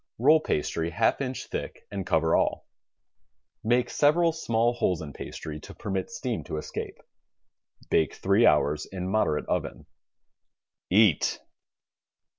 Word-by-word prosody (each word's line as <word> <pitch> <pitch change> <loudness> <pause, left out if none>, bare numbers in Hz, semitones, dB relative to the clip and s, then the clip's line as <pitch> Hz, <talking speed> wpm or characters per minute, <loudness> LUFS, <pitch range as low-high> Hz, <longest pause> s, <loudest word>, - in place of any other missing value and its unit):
Roll 150 +7 +5
pastry 80 - -1
half 110 +9 +1
inch 130 -1 -3
thick - - -6
and 95 -2 -4
cover 80 -1 +2
all. - - 0 1.0
Make 120 +2 +2
several 165 +3 +3
small 120 -7 +1
holes 90 -7 0
in 75 -4 -7
pastry 75 -1 -7
to - - -12
permit 95 -2 -3
steam 130 -7 -4
to - - -4
escape. 75 - -6 0.9
Bake 80 - +2
three 100 +5 +3
hours 75 0 +2
in 90 -1 -5
moderate 95 -6 +1
oven. - - -3 1.0
EAT. 100 -4 +3
100 Hz, 125 wpm, -27 LUFS, 80-120 Hz, 1.0 s, Roll